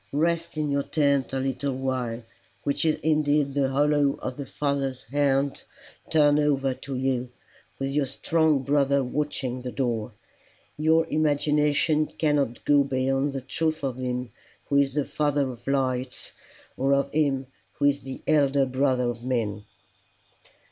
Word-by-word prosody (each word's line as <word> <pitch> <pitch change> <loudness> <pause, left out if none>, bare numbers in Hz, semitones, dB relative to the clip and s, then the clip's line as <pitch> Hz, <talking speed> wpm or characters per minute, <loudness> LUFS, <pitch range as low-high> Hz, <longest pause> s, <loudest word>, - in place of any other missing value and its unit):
Rest 170 +2 0
in 150 -1 0
your 140 0 +1
tent 140 -2 +1
a 135 - -2
little 135 +1 -2
while, 130 -3 -2 0.4
which 140 +3 -1
is 155 - +3
indeed 150 -2 +2
the 140 -1 +1
hollow 145 0 +2
of 130 - -4
the 140 -2 -6
Father's 135 -3 -2
hand 140 +2 0 0.5
turned 150 -2 +4
over 135 -3 +1
you, 130 -2 -1 0.5
with 135 0 -2
your 140 -1 +1
strong 155 +1 +1
brother 140 0 +2
watching 130 -2 -3
the 125 0 -5
door. 120 -4 -2 0.6
Your 160 +2 +3
imagination 150 0 +2
cannot 145 -6 -1
go 145 -1 +5
beyond 135 +1 0
the 135 - -3
truth 155 +4 -2
of 130 -3 -2
him 125 -1 -3 0.4
who 140 - +3
is 140 -1 +2
the 145 -2 +1
Father 145 -3 0
of 120 0 -13
lights, 130 -2 -1 0.4
or 135 +1 +2
of 140 0 0
him 140 -3 +1 0.3
who 145 - -1
is 140 0 +3
the 135 -1 -8
Elder 140 -3 +3
Brother 130 -1 +1
of 120 -1 -4
men." 110 -5 -2
140 Hz, 150 wpm, -26 LUFS, 130-145 Hz, 0.6 s, go